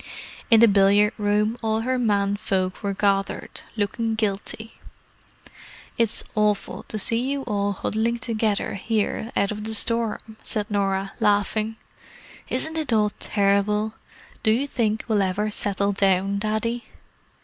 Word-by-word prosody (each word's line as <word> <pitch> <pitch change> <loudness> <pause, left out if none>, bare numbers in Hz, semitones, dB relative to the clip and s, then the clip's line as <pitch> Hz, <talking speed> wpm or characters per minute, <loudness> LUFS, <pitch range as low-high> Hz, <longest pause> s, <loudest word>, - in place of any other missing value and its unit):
In 225 -2 +7
the 235 - +8
billiard 200 +1 +4
room 210 +2 +1
all 220 -1 0
her 255 +2 0
men 205 -4 +1
folk 185 -3 -2
were 200 -2 -2
gathered, 195 -1 -1 0.2
looking 220 +2 -1
guilty. 220 +1 -3 1.2
"It's 230 -2 +2
awful 210 -1 0
to 215 - -3
see 230 +2 +4
you 280 -1 -2
all 205 -4 -1
huddling 220 +4 -1
together 220 -4 -1
here 220 +2 -2
out 200 - +1
of 210 0 -5
the 220 0 0
storm!" 225 -1 0
said 210 -2 -4
Norah, 195 -1 0
laughing. 215 +2 +1 0.7
"Isn't 315 +5 0
it 300 -5 -3
all 210 -2 +3
terrible! 210 +1 +1 0.5
Do 220 - +2
you 235 +6 +2
think 220 -6 -1
we'll 215 -3 +2
ever 200 +3 0
settle 200 -1 -1
down, 195 0 +1
Daddy?" 220 +3 -2
210 Hz, 140 wpm, -24 LUFS, 200-225 Hz, 1.2 s, the